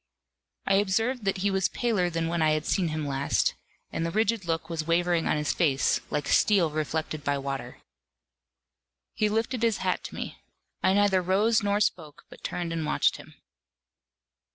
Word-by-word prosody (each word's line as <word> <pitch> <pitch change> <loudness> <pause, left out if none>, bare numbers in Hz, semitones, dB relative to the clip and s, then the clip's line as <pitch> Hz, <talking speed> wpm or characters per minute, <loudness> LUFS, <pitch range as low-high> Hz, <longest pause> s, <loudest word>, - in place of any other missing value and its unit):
I 195 - +3
observed 225 +4 0
that 195 0 +1
he 200 - +3
was 190 -1 +1
paler 215 -7 0
than 165 -1 -2
when 170 0 -1
I 155 -1 +4
had 155 0 -1
seen 185 -4 +1
him 155 -1 -3
last, 140 0 +1 0.4
and 165 - -2
the 165 - -1
rigid 215 +1 0
look 165 -1 -2
was 165 -2 -4
wavering 170 0 +2
on - - +1
his 150 -1 0
face, 140 -6 +2
like 145 -1 -2
steel 185 -7 +3
reflected 155 0 -3
by 145 -1 0
water. 135 -2 -5 1.4
He 215 - +1
lifted 225 +3 -1
his 230 -2 +2
hat - - 0
to - - -7
me. - - -6 0.4
I 190 - +3
neither 200 -2 +3
rose 205 +5 +2
nor 205 0 +1
spoke, 160 -7 -2
but - - -14
turned 175 -2 -3
and 165 -1 -2
watched - - +1
him. - - -14
175 Hz, 175 wpm, -27 LUFS, 155-205 Hz, 1.4 s, I